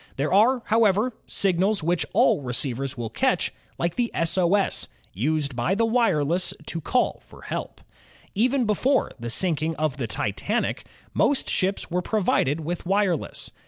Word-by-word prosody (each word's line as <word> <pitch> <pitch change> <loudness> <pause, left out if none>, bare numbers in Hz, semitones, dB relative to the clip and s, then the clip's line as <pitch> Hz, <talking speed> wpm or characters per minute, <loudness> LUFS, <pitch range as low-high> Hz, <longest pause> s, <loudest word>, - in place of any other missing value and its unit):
There 145 +5 -1
are, 235 +5 +4
however, 220 +2 +3
signals 195 0 +1
which 170 +1 0
all - - +3
receivers 130 +1 -2
will 115 -2 -4
catch, - - 0 0.2
like 170 0 -1
the 240 +2 0
S. 165 0 +1
O. 185 0 +3
S., 200 -2 0 0.3
used 140 - -1
by 125 +11 0
the 230 +2 +2
wireless 185 - +1
to 165 - -4
call 250 - 0
for. - - -16
help. - - -5 0.5
Even 250 +4 +2
before 250 +6 +1
the 120 0 -5
sinking 160 +2 +1
of 155 -3 -1
the 125 -4 -2
Titanic, 155 - -2 0.3
most 285 - +2
ships 190 -1 -1
were 180 +1 +1
provided 180 -7 +1
with 170 +3 -4
wireless. 190 -3 -1
175 Hz, 155 wpm, -24 LUFS, 150-215 Hz, 0.5 s, are